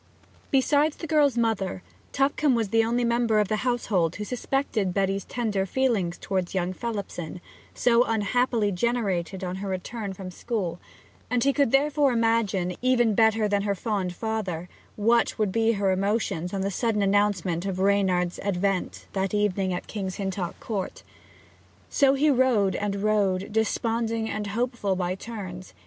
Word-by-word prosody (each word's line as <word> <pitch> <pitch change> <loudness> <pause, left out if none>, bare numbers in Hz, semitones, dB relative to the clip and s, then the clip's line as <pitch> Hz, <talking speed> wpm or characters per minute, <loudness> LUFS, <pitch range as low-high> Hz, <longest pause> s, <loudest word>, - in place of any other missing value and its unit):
Besides 290 +2 +3
the - - -6
girl's 290 -5 +3
mother, 200 - 0 0.3
Tupcombe 275 0 +2
was 225 -3 0
the 225 +2 +3
only 240 +2 0
member 235 -2 +2
of 210 -2 +1
the 215 - +1
household 210 -9 0
who 210 - -4
suspected 225 -4 -1
Betty's 195 0 0
tender 210 -5 -1
feelings 205 -8 0
towards 190 -1 -2
young 185 0 0
Phelipson, 195 -6 -5 0.4
so 240 -1 +4
unhappily 225 0 +1
generated 195 -3 -1
on 180 0 -3
her 195 0 -4
return 195 +2 -4
from 185 -1 -8
school; 185 -5 -3 0.5
and 245 -1 +1
he 275 - +3
could 280 -3 +2
therefore 280 -1 +3
imagine, 225 -6 +1
even 240 -3 +3
better 220 0 +3
than 205 -1 +1
her 200 0 0
fond 195 -4 -2
father, 195 -6 -3 0.3
what 230 +3 +2
would 210 -4 +1
be 225 +3 +2
her 200 -2 +1
emotions 190 -3 -1
on 195 - -2
the 195 +1 -1
sudden 215 0 0
announcement 195 -3 +1
of 190 -2 -2
Reynard's 190 -2 +1
advent 195 -1 -1
that 195 +1 -1
evening 195 -2 +1
at 180 - -3
King's 190 -3 -4
Hintock 190 -3 -4
Court. 200 -5 -4 0.9
So 275 -1 +4
he 295 +2 +3
rode 245 -7 +3
and 200 -1 -2
rode, 200 -2 +1
desponding 225 +1 0
and 210 0 -3
hopeful 225 -2 -1
by 180 -1 -1
turns. 190 -3 -8
205 Hz, 155 wpm, -26 LUFS, 190-235 Hz, 0.9 s, so